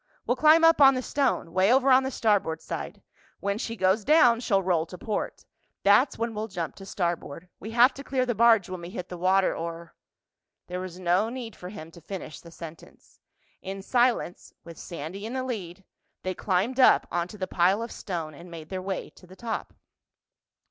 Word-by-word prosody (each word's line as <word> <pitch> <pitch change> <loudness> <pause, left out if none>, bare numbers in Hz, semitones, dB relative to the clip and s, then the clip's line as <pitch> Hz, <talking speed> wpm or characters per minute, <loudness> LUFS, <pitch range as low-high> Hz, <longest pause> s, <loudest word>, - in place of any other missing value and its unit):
"We'll 245 - +1
climb 310 +5 +5
up 330 -2 +6
on 270 -1 +8
the 255 - -2
stone—way 200 -9 +1
over 265 +1 +4
on 260 +1 +7
the 265 - -2
starboard 205 -10 +1
side. - - -7 0.4
When 200 +1 -2
she 230 -1 -4
goes 190 +1 +2
down, 250 -5 +5
she'll 195 -5 +1
roll 170 -3 +1
to 180 - -10
port. 210 +3 -4 0.4
That's 205 +7 +4
when 230 0 -2
we'll 215 +1 -4
jump 175 -6 -4
to 195 -1 -11
starboard. 170 -3 -3
We 215 - -7
have 240 +3 +5
to 275 - -9
clear 260 -2 0
the 245 - 0
barge 225 -3 +4
when 185 -1 -6
we 170 - -7
hit 180 -2 -7
the 180 - -7
water 190 +2 +2
or...." 170 0 -6 0.7
There 180 0 -5
was 185 -1 -7
no 185 +4 +2
need 240 -3 -7
for 180 - -9
him 165 -5 -10
to 170 - -14
finish 185 -6 -7
the 170 - -14
sentence. 165 -1 -13 0.4
In 195 0 -6
silence, 240 -6 0
with 170 -2 -11
Sandy 170 +4 -7
in 225 +3 -5
the 260 -1 -2
lead, 195 -7 -6 0.4
they 185 - -2
climbed 200 +8 -1
up 255 - +6
onto 175 +4 -3
the 190 - -2
pile 185 +4 +2
of 230 - -7
stone 165 -6 -5
and 170 +4 -12
made 160 -2 -10
their 185 -1 -4
way 190 0 -4
to 180 - -18
the 185 - -14
top. 230 +1 -5
195 Hz, 200 wpm, -26 LUFS, 175-235 Hz, 0.7 s, on